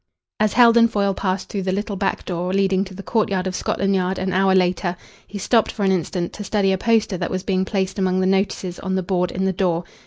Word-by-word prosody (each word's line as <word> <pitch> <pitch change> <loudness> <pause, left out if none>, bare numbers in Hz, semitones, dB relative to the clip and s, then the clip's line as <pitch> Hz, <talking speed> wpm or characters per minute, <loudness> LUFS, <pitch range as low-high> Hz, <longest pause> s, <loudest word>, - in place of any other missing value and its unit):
As 215 -1 +2
Heldon 235 -1 +6
Foyle 200 -3 0
passed 190 -1 -2
through 200 - -4
the 185 0 -1
little 205 +2 -3
back 195 0 -2
door 180 0 -3
leading 195 -1 +2
to 190 -1 -11
the 200 - -8
courtyard 200 -5 0
of 185 -1 -3
Scotland 195 0 -1
Yard 185 0 0
an 190 0 -2
hour 190 0 +3
later, 180 -1 +1 0.3
he 205 - -7
stopped 225 +3 +2
for 205 - -4
an 190 - +3
instant 175 -1 -2
to 210 - -7
study 200 -1 +1
a 190 - +1
poster 225 -4 +1
that 175 - -2
was 185 0 -3
being 190 -1 0
placed 190 0 -2
among 185 -1 +1
the 185 - +1
notices 190 -1 -1
on 190 -1 -2
the 190 - -1
board 180 -1 0
in 190 +1 -2
the 190 - +1
door. 175 -2 0
190 Hz, 245 wpm, -21 LUFS, 185-200 Hz, 0.3 s, Heldon